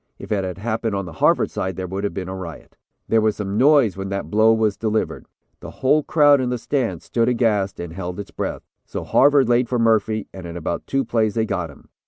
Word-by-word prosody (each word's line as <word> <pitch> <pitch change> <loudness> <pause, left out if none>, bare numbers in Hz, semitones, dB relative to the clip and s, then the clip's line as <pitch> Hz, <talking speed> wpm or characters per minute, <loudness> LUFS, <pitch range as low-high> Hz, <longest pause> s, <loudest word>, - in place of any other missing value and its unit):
If - - -10
it 100 -2 +1
had 90 -2 -4
happened 110 0 -2
on 100 -1 -2
the 85 - -8
Harvard - - +2
side, 95 -1 -3
there 95 - -4
would 95 +2 -4
have 100 - -2
been 95 -2 -4
a 95 - -5
riot. 85 -4 -9 0.3
There 115 - +3
was 110 -1 +1
some 100 -1 -4
noise 140 -6 +5
when 95 0 -5
that 100 0 -4
blow 110 +1 +5
was 110 -2 +2
delivered; 110 -1 -2 0.3
the - - -9
whole 150 +4 +2
crowd 145 -2 +4
in 125 - -1
the 125 - -1
stand 115 - -2
stood 115 0 0
aghast 110 -5 0
and 85 -2 -6
held 90 +1 -5
its 100 - -7
breath. - - -4 0.2
So - - -6
Harvard 140 -2 +4
laid 120 0 +2
for 125 - 0
Murphy 110 -2 +1
and 95 -2 -8
in 85 +1 -7
about 85 0 -4
two 135 -1 0
plays 110 -2 0
they 110 -1 +1
got 90 -6 -3
him. 75 - -17
110 Hz, 240 wpm, -21 LUFS, 95-120 Hz, 0.3 s, noise